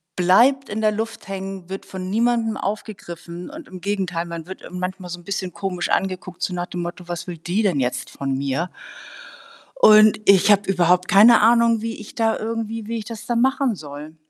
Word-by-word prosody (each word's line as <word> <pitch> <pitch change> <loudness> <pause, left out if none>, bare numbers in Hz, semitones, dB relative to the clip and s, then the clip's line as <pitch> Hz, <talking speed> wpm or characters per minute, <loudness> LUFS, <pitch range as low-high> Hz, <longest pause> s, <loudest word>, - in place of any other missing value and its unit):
bleibt 240 +10 +4
in 210 +1 -3
der 215 -1 +3
Luft 225 0 -5
hängen, 195 -2 -6
wird 195 +1 -6
von 185 -1 -6
niemandem 230 +1 +1
aufgegriffen. 180 -4 -6
Und 310 +2 -10
im 185 -1 -10
Gegenteil, 185 -4 -2
man 170 -1 -7
wird, 190 - -9
äh, - - -11
manchmal 180 0 -5
so 175 0 -6
'n - - -16
bisschen 190 0 -4
komisch 185 -3 -3
angeguckt, 185 -1 -2
so 180 - -1
nach 175 0 -3
dem 175 - -5
Motto: 175 +1 -7
„Was 175 0 -5
will 175 -2 -6
die 175 +7 -1
denn 180 -9 +1
jetzt 125 -1 -2
von 135 -1 -3
mir?“ 140 +6 -2 1.1
und 215 - +7
ich 200 +1 +6
habe 205 -1 +3
überhaupt 180 -1 +3
keine 215 +5 +7
Ahnung, 230 0 +4
wie 225 0 -4
ich 215 - -11
da 225 -1 +1
irgendwie 225 -1 -4
wie 230 +1 -3
ich 215 - -6
das 225 -1 -8
dann 235 -1 0
machen 265 -2 +1
soll. 150 -1 -10
195 Hz, 200 wpm, -22 LUFS, 175-220 Hz, 1.1 s, und